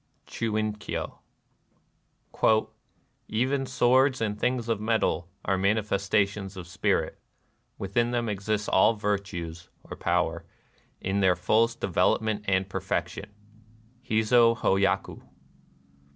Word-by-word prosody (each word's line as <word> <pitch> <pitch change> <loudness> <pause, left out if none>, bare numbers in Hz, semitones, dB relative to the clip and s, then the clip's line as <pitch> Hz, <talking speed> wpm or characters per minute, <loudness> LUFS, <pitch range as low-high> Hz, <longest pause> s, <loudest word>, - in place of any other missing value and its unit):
— - - -44
Chit 115 -2 -3
in 110 -1 -1
kyo." 105 - -5 1.7
" - - -43
Even 130 +4 0
swords 130 +2 +3
and 105 -2 -1
things 125 -1 0
of 115 -3 -1
metal 105 -6 0 0.2
are 95 -1 +1
manifestations 100 -1 0
of 90 - -7
spirit: 90 - -1 0.6
within 115 +5 0
them 120 -1 -1
exist 105 +1 -2
all 110 +4 +4
virtues 95 -5 -4
[or - - -9
''power - - 0 0.3
'] - - -37
in 95 +1 0
their 95 -2 +4
fullest 115 +6 +1
development 105 +3 +1
and 95 -1 +1
perfection." 95 +1 -3 0.4
— 115 +3 -31
Hiz6 115 +1 +4
h6 95 0 +2
taku. 95 0 0
105 Hz, 125 wpm, -27 LUFS, 95-115 Hz, 1.7 s, all